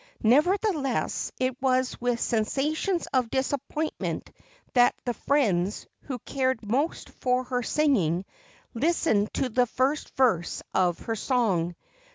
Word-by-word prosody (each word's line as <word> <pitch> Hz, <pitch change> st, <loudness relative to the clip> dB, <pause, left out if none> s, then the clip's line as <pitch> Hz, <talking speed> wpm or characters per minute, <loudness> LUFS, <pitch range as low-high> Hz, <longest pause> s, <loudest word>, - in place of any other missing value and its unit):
Nevertheless, 300 Hz, -, +2 dB
it 255 Hz, 0 st, -1 dB
was 255 Hz, -2 st, +1 dB
with 245 Hz, -1 st, 0 dB
sensations 295 Hz, -, 0 dB
of 255 Hz, -3 st, +2 dB
disappointment 280 Hz, +4 st, -2 dB, 0.4 s
that 245 Hz, -1 st, +5 dB
the 245 Hz, -, 0 dB
friends, 210 Hz, -9 st, +1 dB, 0.2 s
who 260 Hz, -3 st, -4 dB
cared 260 Hz, -2 st, -1 dB
most 275 Hz, +9 st, -1 dB
for 250 Hz, 0 st, 0 dB
her 250 Hz, -1 st, -2 dB
singing, 200 Hz, -, +1 dB, 0.5 s
listened 240 Hz, -6 st, +1 dB
to 265 Hz, -, +1 dB
the 250 Hz, +1 st, +2 dB
first 265 Hz, +6 st, 0 dB
verse 225 Hz, -11 st, +2 dB
of 180 Hz, -2 st, +2 dB
her 225 Hz, -, -2 dB
song. 195 Hz, -8 st, 0 dB
255 Hz, 120 wpm, -27 LUFS, 225-280 Hz, 0.5 s, that